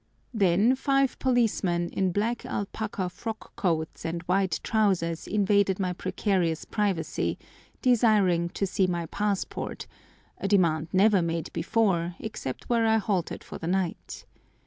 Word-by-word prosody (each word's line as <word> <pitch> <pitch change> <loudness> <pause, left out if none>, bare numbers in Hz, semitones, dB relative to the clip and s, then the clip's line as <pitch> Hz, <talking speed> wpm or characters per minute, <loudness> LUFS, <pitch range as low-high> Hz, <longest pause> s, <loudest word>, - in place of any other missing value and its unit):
Then 200 +3 +4
five 275 0 +1
policemen 210 -9 +1
in 190 -1 0
black 220 +5 -1
alpaca 200 -1 -3
frock 220 +5 -7
coats 165 -7 -1
and 165 +1 -3
white 185 -1 +1
trousers 185 -7 +1
invaded 200 -2 +2
my 180 -2 0
precarious 185 -3 -1
privacy, 200 -6 -1 0.5
desiring 210 -8 +3
to 195 - -2
see 190 0 +1
my 175 -2 -2
passport—a 200 +1 -5
demand 165 -6 +2
never 195 0 +4
made 165 -1 -3
before 175 -2 +1
except 170 - -6
where 230 -2 +2
I 220 0 +4
halted 195 -5 -2
for - - -9
the 165 - -5
night. 185 -1 -2
190 Hz, 125 wpm, -27 LUFS, 170-215 Hz, 0.5 s, Then